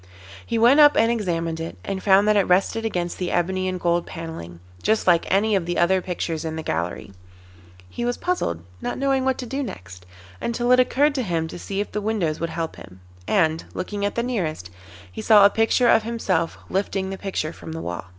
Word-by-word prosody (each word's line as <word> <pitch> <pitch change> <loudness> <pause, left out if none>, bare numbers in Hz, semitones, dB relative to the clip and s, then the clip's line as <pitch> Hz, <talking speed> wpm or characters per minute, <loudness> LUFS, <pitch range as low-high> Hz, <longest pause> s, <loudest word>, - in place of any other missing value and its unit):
He 230 - -2
went 240 +6 +5
up 295 -1 +7
and 230 +1 +4
examined 170 -7 -2
it, 165 0 -6
and 195 -1 -4
found 200 +1 +4
that 210 - +4
it 200 -2 +3
rested 195 +5 +2
against 175 -5 -2
the 180 -1 -2
ebony 185 +2 0
and 185 -1 -2
gold 170 0 0
panelling, 160 - -8 0.2
just 220 0 +1
like 175 -2 +3
any 205 +2 +3
of 180 -3 -1
the 175 - -2
other 185 +2 +3
pictures 170 -3 -3
in 160 -1 -4
the 160 - -5
gallery. 85 - -3 0.8
He 165 - -6
was 245 0 -1
puzzled, 85 - -2 0.2
not - - -3
knowing 270 -1 +1
what 265 -1 +1
to 255 - -5
do 270 +4 -3
next, 95 - -8 0.3
until 240 +1 0
it 250 - +6
occurred 280 +4 +3
to 270 - -1
him 170 -7 -1
to - - -8
see 195 +2 -3
if 210 - -5
the 210 - -3
windows 200 -8 -1
would 165 - -2
help 165 0 -4
him, 95 -1 -13 0.3
and, 160 -5 +2
looking 200 +2 -4
at 205 - -1
the 235 - 0
nearest, 165 - -3 0.4
he - - -6
saw 210 -2 +7
a 200 - +6
picture 225 +2 +2
of 225 - +5
himself 200 -7 -1
lifting 190 0 -2
the - - -3
picture 185 -5 -3
from - - -10
the 160 - -5
wall. 85 +2 -5
190 Hz, 220 wpm, -23 LUFS, 165-225 Hz, 0.8 s, up